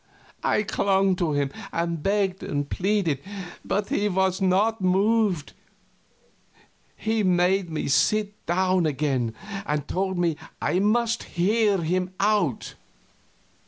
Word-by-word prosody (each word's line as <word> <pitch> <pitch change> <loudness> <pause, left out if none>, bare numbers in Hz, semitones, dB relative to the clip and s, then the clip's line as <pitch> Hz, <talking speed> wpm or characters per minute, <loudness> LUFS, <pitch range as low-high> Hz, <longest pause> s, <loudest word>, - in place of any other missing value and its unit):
I 210 - +2
clung 195 -2 +2
to 170 -4 0
him 140 -1 0 0.2
and 170 -1 -2
begged 195 0 0
and 145 -1 -2
pleaded, 185 -7 0 0.4
but 205 +1 -1
he 205 +1 +1
was 190 0 +1
not 200 +4 +2
moved. 190 -2 +1 1.4
He 220 0 -1
made 185 0 +2
me 155 - -3
sit 210 +8 +1
down 185 -1 +2
again, 135 -6 -1 0.3
and 150 -1 -2
told 190 0 -1
me 170 -3 +1 0.2
I 180 - +1
must 230 +3 +1 0.2
hear 205 +3 +3
him 180 +3 -1
out. 200 - +1
185 Hz, 120 wpm, -25 LUFS, 170-205 Hz, 1.4 s, hear